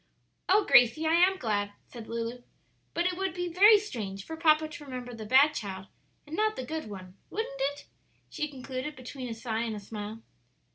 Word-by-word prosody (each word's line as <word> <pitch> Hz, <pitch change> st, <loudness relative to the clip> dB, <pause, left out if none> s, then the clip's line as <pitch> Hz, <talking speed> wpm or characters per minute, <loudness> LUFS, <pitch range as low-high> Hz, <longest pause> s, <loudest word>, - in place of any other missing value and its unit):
"Oh, 405 Hz, +2 st, +5 dB
Gracie, 245 Hz, +6 st, +5 dB
I 320 Hz, -, +3 dB
am 365 Hz, +3 st, +5 dB
glad," 205 Hz, -, -1 dB
said 235 Hz, -3 st, -10 dB
Lulu; 230 Hz, +1 st, -4 dB, 0.5 s
"but 340 Hz, -, +1 dB
it 360 Hz, 0 st, +1 dB
would 380 Hz, -3 st, -1 dB
be 355 Hz, 0 st, -2 dB
very 415 Hz, +4 st, +8 dB
strange 210 Hz, -, -5 dB
for 320 Hz, -, -6 dB
papa 310 Hz, -1 st, +4 dB
to 305 Hz, -1 st, -10 dB
remember 250 Hz, -3 st, -7 dB
the 220 Hz, -2 st, -7 dB
bad 275 Hz, +6 st, +6 dB
child 190 Hz, -3 st, -5 dB, 0.4 s
and 300 Hz, +2 st, -6 dB
not 430 Hz, +2 st, +1 dB
the 260 Hz, -, -5 dB
good 315 Hz, -4 st, -5 dB
one, 185 Hz, -2 st, -9 dB
wouldn't 390 Hz, -11 st, -4 dB
it?" -, -, -14 dB, 0.4 s
she 300 Hz, -, -3 dB
concluded, 265 Hz, 0 st, -6 dB
between 255 Hz, 0 st, -7 dB
a 225 Hz, -, -4 dB
sigh 225 Hz, -1 st, -2 dB
and 230 Hz, -2 st, -2 dB
a -, -, -5 dB
smile. 210 Hz, +2 st, -7 dB
255 Hz, 195 wpm, -29 LUFS, 225-320 Hz, 0.5 s, very